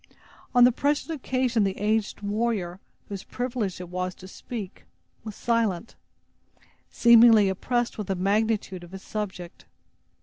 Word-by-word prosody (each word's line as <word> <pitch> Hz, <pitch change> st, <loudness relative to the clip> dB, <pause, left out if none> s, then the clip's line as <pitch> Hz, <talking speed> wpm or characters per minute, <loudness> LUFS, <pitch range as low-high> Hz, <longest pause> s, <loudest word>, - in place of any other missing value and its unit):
On 245 Hz, -, +7 dB
the 250 Hz, -, +7 dB
present 290 Hz, +5 st, -1 dB
occasion, 255 Hz, -5 st, 0 dB
the 195 Hz, -1 st, -1 dB
aged 210 Hz, 0 st, -1 dB
warrior 205 Hz, -4 st, -1 dB, 0.3 s
whose 200 Hz, -2 st, -6 dB
privilege 245 Hz, -7 st, -3 dB
it 180 Hz, -1 st, -8 dB
was 185 Hz, 0 st, -3 dB
to 185 Hz, -, -12 dB
speak, 200 Hz, 0 st, -8 dB, 0.4 s
was 215 Hz, -2 st, -7 dB
silent, 230 Hz, -4 st, -1 dB, 0.9 s
seemingly 230 Hz, -3 st, +6 dB
oppressed 240 Hz, +5 st, -1 dB
with 210 Hz, -, -4 dB
the 195 Hz, -, -1 dB
magnitude 200 Hz, -1 st, 0 dB
of 175 Hz, +1 st, -13 dB
his 190 Hz, -, -8 dB
subject. 190 Hz, -5 st, -6 dB
210 Hz, 135 wpm, -26 LUFS, 190-235 Hz, 0.9 s, On